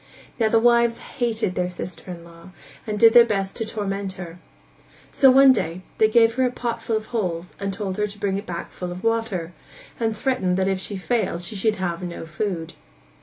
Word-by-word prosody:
Now 220 -1 +3
the 225 - +4
wives 235 0 +4
hated 230 -8 -2
their 180 0 -1
sister 180 +1 -8
in 170 -2 -7
law 170 +1 -14 0.4
and 210 -1 -2
did 225 0 +7
their 240 - +9
best 195 -4 -2
to 225 - -3
torment 200 -2 -3
her. 180 -2 -9 0.7
So 270 - +6
one 270 +1 +8
day 175 -5 -3 0.2
they 220 - +6
gave 225 +1 +4
her 260 +2 +1
a 250 - +3
pot 235 -2 -3
full 225 -1 0
of 215 - -6
holes 180 -5 -2
and 200 0 -2
told 190 -1 -4
her 210 0 +1
to 205 0 -12
bring 195 -1 0
it 205 - -11
back 170 -1 -5
full 180 -1 -6
of 180 +1 -8
water; 225 -7 -1 0.5
and 225 -2 -1
threatened 195 -8 0
that 190 0 +1
if 195 -1 0
she 200 +1 -5
failed 190 -3 -1
she 210 - -5
should 215 +2 +1
have 175 -3 -3
no 175 -2 -6
food. 165 0 -4
200 Hz, 215 wpm, -23 LUFS, 180-225 Hz, 0.7 s, their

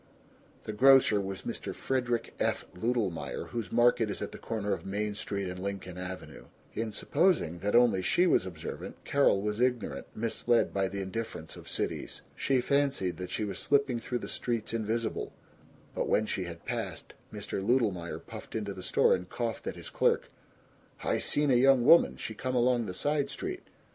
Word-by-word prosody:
(The 110 - -5
grocer 130 -3 +6
was 95 0 -5
Mr. - - -4
Frederick 120 -3 -1
F. - - 0
Ludelmeyer, 105 -3 -2
whose 115 -6 -4
market 120 -2 +4
is 100 - -3
at - - -4
the - - -9
corner 105 -3 -2
of - - -4
Main 105 +2 -2
Street 100 -1 -3
and 90 0 -5
Lincoln 95 -2 -5
Avenue. 90 0 -7 0.3
In 110 -1 -2
supposing 105 - +1
that 105 +4 0
only 120 -6 +5
she 175 - +3
was 95 - +3
observant 85 -4 -7
Carol 140 -8 +3
was 105 +2 -1
ignorant, 125 -1 0
misled 115 +1 +1
by 95 -1 +1
the 100 +1 -4
indifference 95 -5 -5
of - - -10
cities. - - -3
She 135 -2 +1
fancied 140 -9 +1
that 90 0 -5
she 110 - -2
was 100 -2 -3
slipping 140 -4 +2
through 120 +1 -3
the - - -7
streets 115 -2 -2
invisible; 115 +1 -2 0.6
but - - -2
when 110 - +3
she 95 -3 -2
had 85 -1 -9
passed, - - -4 0.2
Mr. 95 - -4
Ludelmeyer 100 -7 +1
puffed - - -10
into 105 -3 -2
the 95 - -8
store - - +3
and 90 0 -2
coughed 115 -2 -3
at - - -3
his - - -9
clerk, - - +1 0.7
"I - - +1
seen 145 -1 +1
a - - +5
young 130 0 +5
woman, 170 - +6
she 110 - -5
come 130 +4 -3
along 120 -2 +3
the 90 - -5
side 145 +3 0
street. 375 0 -5
110 Hz, 180 wpm, -30 LUFS, 95-125 Hz, 0.7 s, grocer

